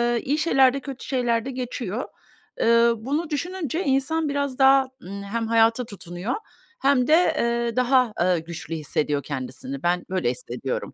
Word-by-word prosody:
eee, 235 - -1
iyi 285 +3 0
şeyler 270 -5 +4
de 275 - -2
kötü 270 -1 -8
şeyler 240 -4 0
de 270 - -4
geçiyor. 245 -3 -4 0.5
Eee, 235 0 +5
bunu 290 +9 -2
düşününce 335 +1 -2
insan 285 +3 +1
biraz 280 -2 -2
daha, 270 0 +6 0.2
ımm, 200 +1 -7
hem 225 +3 -3
hayata 230 +2 +3
tutunuyor 185 +1 -5 0.5
hem 270 -2 +3
de, 305 - +4
eee, 235 -8 +2
daha, 250 -2 +3
aaa, 180 0 +2
güçlü 165 0 -6
hissediyor 150 -2 -1
kendisini. 130 0 -6
Ben 175 +1 +1
böyle 185 0 0
hissediyorum. - - -5
245 Hz, 160 wpm, -24 LUFS, 200-275 Hz, 0.5 s, daha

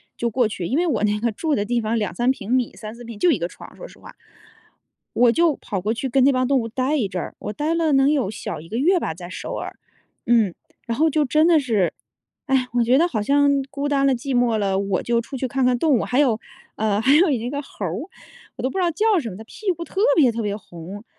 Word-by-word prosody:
就 235 - -1
过 240 0 +1
去。 190 -5 -5
因 260 - 0
为 350 - +2
我 250 -11 0
那 210 0 +1
个 230 +1 0
住 300 +7 -1
的 205 - -1
地 240 +1 0
方 220 +2 -1
2-3 215 +4 -1
平 230 -4 -2
米、 250 -2 +1
3-4 225 +2 -9
平， 230 -2 -9
就 345 +10 +3
一 225 - 0
个 170 - -1
床， - - -13
说 - - -9
实 - - -17
话。 - - -14 1.0
我 240 0 +5
就 330 +2 +2
跑 195 - -5
过 210 +5 -1
去 255 +3 -3
跟 265 +1 +3
那 280 - +6
帮 255 -1 +1
动 270 0 +2
物 230 - -3
待 260 +6 -1
一 225 - 0
阵 185 -2 -4
儿， - - -7
我 210 - -5
待 300 +8 -1
了 325 -3 +1
能 270 +2 +4
有 270 -10 0
小 210 - -6
1 160 - -12
个 220 - -6
月 355 +7 +3
吧， 160 - -3
在 175 +1 -10
首 - - -6
尔。 - - -5 0.5
嗯， 225 -6 +3 0.3
然 230 -1 -3
后 320 +2 +3
就 305 0 +1
真 305 +4 +3
的 340 -2 +5
是， 225 - +1 0.5
唉， 265 -2 +2
我 240 -1 +3
觉 245 +3 +4
得 335 +4 +4
好 225 -11 -2
像 285 +6 +3 0.2
孤 280 +1 -3
单 280 -1 +2
了、 275 - +4
寂 255 +1 -2
寞 240 -2 +2
了， 195 -2 0
我 195 -1 -1
就 235 -1 0
出 250 +4 -7
去 260 - -2
看 265 0 0
看 250 -1 +3
动 310 -1 +3
物。 - - -1
还 255 - 0
有 255 -7 +3 0.4
呃， 210 -2 0
还 265 +6 +4
有 340 +3 +5
一 245 -4 -1
个 285 +2 -3
猴 215 -7 -7
儿， 165 - -2 0.6
我 - - -6
都 260 - +1
不 385 - -6
知 - - +1
道 345 - +2
叫 425 +5 +2
什 235 - -5
么， 185 - -9
它 220 - -9
屁 400 - -3
股 340 -1 -5
特 385 - -3 0.2
别 280 -6 +6
特 230 - -3
别 205 -1 -2
红， 190 +3 -10
245 Hz, 285 characters per minute, -22 LUFS, 215-285 Hz, 1.0 s, 那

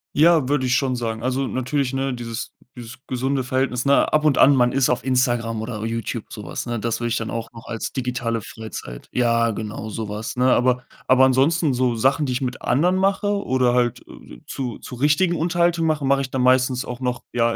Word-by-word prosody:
Ja, 160 -2 +5
würde 140 -3 +1
ich 125 - +2
schon 130 -1 +1
sagen. 115 -2 -3
Also, 130 +2 -1
natürlich, 130 +1 -1
ne, 135 0 -1
dieses 115 -1 -5 0.2
dieses 120 -2 -9
gesunde 130 +1 -1
Verhältnis, 130 0 -1
ne? 140 0 +3
Ab 155 0 +3
und 150 -3 +3
an 140 +1 +6
man 125 -1 +3
ist 135 -1 +2
auf 125 - 0
Instagram 120 -3 0
oder 110 -2 -5
Youtube, 115 0 -3
so 105 - -8
was, 85 - -5
ne? 120 -1 -2
Das 115 +1 -2
würde 120 0 -2
ich 120 - 0
dann 115 - -4
auch 115 0 -5
noch 115 -1 -13
als 115 -2 -4
digitale 125 -3 -2
Freizeit 110 - -9
ja, 115 -1 +2
genau 110 0 -6
so 110 0 -5
was, 105 +3 -5
ne? 125 +1 +3
Aber 125 0 +2 0.2
aber 130 0 +6
ansonsten 140 +3 +2
so 125 -1 +1
Sachen, 135 +6 +2
die 130 - -1
ich 125 - -2
mit 125 -1 -3
anderen 170 +9 +2
mache 195 +2 +1 0.2
oder 130 -2 +2
halt 120 -2 0 0.4
zu 125 -4 -5
zu - - -9
richtigen 150 +7 +2
Unterhaltung 170 0 +1
mache, 150 -3 0
mache 140 0 +3
ich 130 - -4
dann 130 - -1
meistens 130 0 +3
auch 125 0 -6
noch, 125 -1 -3
ja, 115 -1 +1
125 Hz, 215 wpm, -22 LUFS, 115-135 Hz, 0.4 s, an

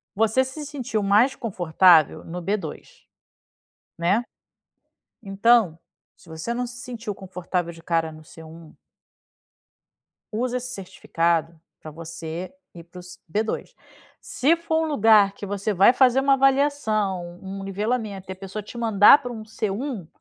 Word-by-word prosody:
Você 225 +5 +2
se 265 +4 -7
sentiu 260 -7 -3
mais 215 +7 +3
confortável 180 - +3
no 175 +2 -7
B2, 190 -4 -5 0.9
né. 185 +8 +1 1.0
Então, 200 -3 +3 0.4
se 170 - -21
você 160 +9 -5
não 245 +1 -2
se 240 +1 -10
sentiu 240 -5 -6
confortável 180 -2 -4
de 165 - -14
cara 165 -1 0
no 155 0 -13
C1 160 0 -13 1.6
usa 250 +2 -1
esse 250 +1 -6
certificado 170 -3 -2 0.2
para 155 - -10
você 165 +2 -7 0.2
ir 170 - -11
para 180 +1 -12
os 180 +1 -12
B2. 215 +1 -2 0.5
Se 300 +6 +1
for 325 -1 -1
um 320 - -2
lugar 215 -7 +5
que 200 - -8
você 200 +1 -2
vai 195 +7 +6
fazer 260 0 +4
uma 275 0 +4
avaliação, 220 -10 +1
um 195 0 -7
nivelamento, 200 -1 -3
e - - -3
a - - -14
pessoa 195 +2 -7
te 210 - -12
mandar 225 +3 +6
para 245 -1 -6
um 220 -2 -7
C1, 215 - -4
200 Hz, 145 wpm, -23 LUFS, 175-240 Hz, 1.6 s, vai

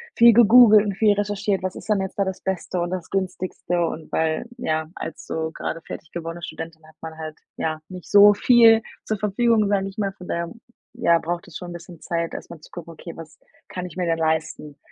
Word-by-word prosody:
viel 235 -1 +7
gegoogelt 220 -2 +7
und 200 -2 -2
viel 215 -1 +4
recherchiert: 205 -1 -1
„Was 185 0 -3
ist - - -10
denn 205 -2 +2
jetzt 190 - -5
da 200 - +2
das 190 -1 -5
Beste 185 -1 -3
und 175 - -2
das 185 -3 -5
Günstigste“ 180 -2 -2
und 160 -1 -6
weil, 160 +7 0
ja, 160 -8 -2
als 165 - -7
so 160 0 -3
grade 165 - -4
fertig 160 - -9
gewordene 170 0 -6
Studentin 160 -1 -8
hat 155 - -19
man 160 -1 -7
halt, 155 -1 -7 0.2
ja, 155 -1 -2
nicht 180 -2 -10
so 205 0 +8
viel 225 0 +6 0.2
zur 215 -1 -2
Verfügung, 215 +1 +2
sage 195 -1 +1
ich 195 - -15
mal. 195 -2 -1
Von 180 -2 -12
daher, 170 0 -2 0.4
ja, 170 -9 +3
braucht 175 +1 -4
es - - -8
schon 180 -1 -8
'n - - -7
bisschen 170 -1 -11
Zeit, 170 -1 -2
erstmal 170 -3 -9
zu - - -16
gucken: 170 -1 -9
„Okay, 170 +2 -9
was 160 -1 -11 0.3
kann 180 -1 -6
ich 180 0 -10
mir 180 - 0
denn 165 -1 +1
leisten, 160 -2 -2
180 Hz, 220 wpm, -23 LUFS, 165-205 Hz, 0.4 s, so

